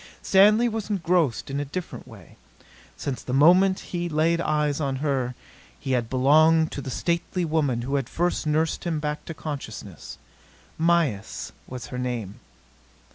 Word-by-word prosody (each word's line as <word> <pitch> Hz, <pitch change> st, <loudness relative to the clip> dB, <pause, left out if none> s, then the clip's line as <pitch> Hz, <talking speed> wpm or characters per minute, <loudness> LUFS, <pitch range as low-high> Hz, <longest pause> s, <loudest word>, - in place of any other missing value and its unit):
Stanley 210 Hz, +5 st, +5 dB
was 220 Hz, -2 st, -4 dB
engrossed 170 Hz, -, 0 dB
in 140 Hz, -, -2 dB
a -, -, -1 dB
different 170 Hz, -1 st, -6 dB
way. 100 Hz, -8 st, -14 dB, 0.6 s
Since 135 Hz, -3 st, -4 dB
the 125 Hz, -, -3 dB
moment 180 Hz, +6 st, +5 dB
he 175 Hz, 0 st, -2 dB
laid 165 Hz, +2 st, +1 dB
eyes 150 Hz, -2 st, 0 dB
on 135 Hz, -2 st, -1 dB
her, 130 Hz, -3 st, -1 dB, 0.4 s
he 135 Hz, -, -4 dB
had 120 Hz, -3 st, 0 dB
belonged 155 Hz, +5 st, +4 dB
to 140 Hz, -, -5 dB
the 135 Hz, -, -6 dB
stately 170 Hz, +5 st, -1 dB
woman 145 Hz, -7 st, 0 dB
who 135 Hz, +3 st, -4 dB
had 135 Hz, -, -3 dB
first 175 Hz, -2 st, -1 dB
nursed 155 Hz, +2 st, 0 dB
him 165 Hz, -3 st, -1 dB
back 150 Hz, 0 st, -4 dB
to 165 Hz, -, -7 dB
consciousness. 110 Hz, -, -7 dB, 0.6 s
Mayis 160 Hz, -11 st, 0 dB, 0.2 s
was 125 Hz, -2 st, -7 dB
her 125 Hz, -, -3 dB
name. 120 Hz, -6 st, -4 dB
150 Hz, 155 wpm, -25 LUFS, 130-170 Hz, 0.6 s, Stanley